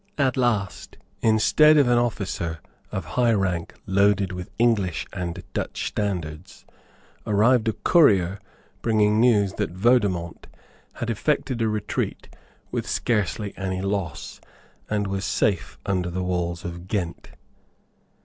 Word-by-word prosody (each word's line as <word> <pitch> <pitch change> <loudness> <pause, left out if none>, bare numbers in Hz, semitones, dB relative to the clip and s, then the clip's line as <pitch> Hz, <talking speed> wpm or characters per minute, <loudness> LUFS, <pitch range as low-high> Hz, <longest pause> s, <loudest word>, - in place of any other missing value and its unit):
At 135 -4 +2
last, 115 -7 -1 0.2
instead 135 +8 +5
of 140 -4 +5
an 120 0 +4
officer 95 -8 -2 0.3
of 95 -4 -4
high 120 +8 +2
rank 90 -5 -1
loaded 100 0 +2
with 90 -1 -6
English 110 -7 +1
and 90 0 -4
Dutch - - -3
standards, 90 -4 -4 0.6
arrived 110 +3 +3
a 110 - +2
courier 100 - +3 0.4
bringing 105 -2 +3
news 105 -5 +3
that - - -1
Vaudemont 95 -6 +1 0.5
had 120 0 -3
effected 130 +1 -1
a 110 - +2
retreat 105 -1 -3 0.4
with - - -3
scarcely 105 -2 -1
any 95 -1 -3
loss, 100 -3 -3 0.5
and 105 -1 0
was 95 0 -3
safe 100 -1 0
under 90 -2 0
the 90 +1 -3
walls 90 -1 -2
of 85 +1 -7
Ghent. 95 -4 -3
100 Hz, 125 wpm, -24 LUFS, 90-115 Hz, 0.6 s, instead